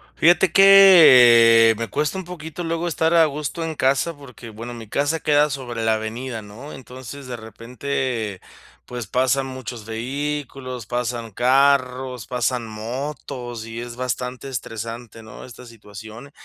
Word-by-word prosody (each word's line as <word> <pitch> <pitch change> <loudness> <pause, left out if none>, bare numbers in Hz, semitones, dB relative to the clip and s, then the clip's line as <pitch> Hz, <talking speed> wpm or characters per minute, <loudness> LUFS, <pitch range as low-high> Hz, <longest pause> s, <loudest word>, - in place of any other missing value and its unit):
Fíjate 175 +1 +3
que, 125 -13 +7
me 115 +1 -4
cuesta 150 +5 -2
un 190 - -6
poquito 170 -1 -8
luego 165 +1 -2
estar 160 +1 0
a 165 - +6
gusto 150 +3 -4
en 160 -1 -4
casa, 140 +6 0
porque, 125 -4 -12
bueno, 115 +3 -8
mi 115 -2 -10
casa 145 +6 -1
queda 150 0 +3
sobre 125 -5 -5
la 110 - +3
avenida, 115 +2 -5
¿no? 110 +8 -11
Entonces, 130 +1 -10
de 125 -1 -6
repente, 115 -1 -5 0.4
pues, 120 -3 -7
pasan 130 +4 0
muchos 130 -4 -8
vehículos, 130 0 -5
pasan 120 -1 -4
carros, 130 0 +1
pasan 125 -1 -2
motos 120 +1 -6
y 115 0 -7
es 120 0 -8
bastante 125 +1 -5
estresante, 115 -2 -7
¿no?, 110 -1 -12
esta 125 0 -13
situación. 110 +3 -12
125 Hz, 140 wpm, -21 LUFS, 115-140 Hz, 0.4 s, que